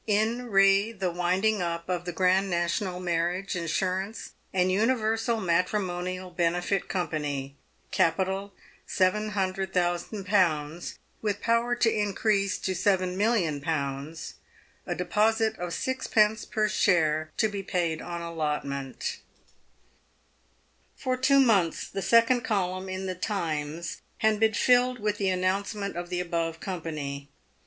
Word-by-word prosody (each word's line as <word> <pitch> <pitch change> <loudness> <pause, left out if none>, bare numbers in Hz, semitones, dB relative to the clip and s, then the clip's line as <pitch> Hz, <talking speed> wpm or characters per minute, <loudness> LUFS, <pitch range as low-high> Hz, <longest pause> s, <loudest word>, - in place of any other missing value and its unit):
IN 220 +4 +1
RE 195 +1 +4
THE 190 -4 -2
WINDING 185 +4 +1
UP 170 -1 -3
OF 180 -1 -2
THE 175 - -3
GRAND 185 +3 +2
NATIONAL 175 +2 -1
MARRIAGE 175 +2 -1
INSURANCE 185 +4 -2 0.2
AND 185 0 +2
UNIVERSAL 225 +1 +1
MATRIMONIAL 185 0 -1
BENEFIT 175 +3 0
COMPANY, 145 -6 -2 0.4
CAPITAL 190 +3 +1 0.4
700,000?., 185 -4 0 0.2
WITH 205 -2 -1
POWER 235 +1 +2
TO 235 -2 +2
INCREASE 205 -1 +1
TO 190 - -2
7,000,000?. 170 - 0 0.5
A - - -1
DEPOSIT 220 +4 +1
OF 175 0 -3
6d. 220 -1 +1
PER 215 -1 +1
SHARE 155 -6 +2
TO 220 - +3
BE 205 -2 -4
PAID 175 -4 -1
ON 170 -1 -5
ALLOTMENT, 150 -5 -3 1.8
For 255 -1 -1
two 265 +2 +4
months 200 -11 +3
the 195 - -4
second 230 +4 +4
column 185 -3 -1
in 185 0 -4
the 185 - -2
Times 170 -4 -3 0.2
had 215 -1 +2
been 220 -1 +3
filled 250 +1 +4
with 210 -2 -2
the 195 -2 +1
announcement 195 +2 -1
of 175 0 -5
the 180 -1 -2
above 165 -2 -2
company. 150 -6 -5
185 Hz, 115 wpm, -27 LUFS, 170-210 Hz, 1.8 s, RE